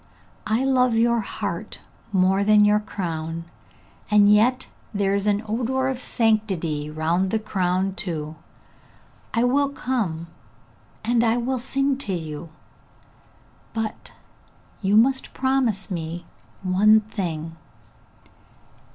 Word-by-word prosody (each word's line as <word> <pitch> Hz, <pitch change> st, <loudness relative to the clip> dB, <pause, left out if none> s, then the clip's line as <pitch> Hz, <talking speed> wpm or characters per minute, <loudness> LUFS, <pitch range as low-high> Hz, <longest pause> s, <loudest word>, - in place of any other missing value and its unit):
I 220 Hz, +4 st, +1 dB
love 255 Hz, -3 st, +3 dB
your 235 Hz, +1 st, +3 dB
heart 210 Hz, -, -5 dB, 0.3 s
more 190 Hz, 0 st, +3 dB
than 210 Hz, 0 st, +5 dB
your 210 Hz, 0 st, +4 dB
crown, 165 Hz, -5 st, -4 dB, 0.6 s
and 210 Hz, -1 st, +6 dB
yet 250 Hz, +5 st, +3 dB, 0.3 s
there 200 Hz, -1 st, +1 dB
is 200 Hz, +1 st, 0 dB
an 205 Hz, +1 st, +1 dB
odour 255 Hz, +4 st, 0 dB
of 260 Hz, -2 st, -3 dB
sanctity 195 Hz, -, 0 dB
round 165 Hz, +5 st, 0 dB
the 220 Hz, -, +1 dB
crown 190 Hz, -3 st, -1 dB
too! 160 Hz, -6 st, -5 dB, 1.0 s
I 230 Hz, -, +3 dB
will 275 Hz, +3 st, +2 dB
come, 220 Hz, -, -2 dB, 0.8 s
and 235 Hz, 0 st, +3 dB
I 230 Hz, 0 st, +2 dB
will 255 Hz, +2 st, -1 dB
sing 275 Hz, +2 st, 0 dB
to 205 Hz, -8 st, -4 dB
you! 160 Hz, -1 st, -5 dB, 1.3 s
But 225 Hz, -1 st, -4 dB, 0.7 s
you 200 Hz, +1 st, +3 dB
must 265 Hz, +4 st, +2 dB
promise 260 Hz, -8 st, 0 dB
me 170 Hz, 0 st, -4 dB, 0.4 s
one 210 Hz, +4 st, +5 dB
thing! 165 Hz, -7 st, -4 dB
210 Hz, 115 wpm, -23 LUFS, 180-235 Hz, 1.3 s, and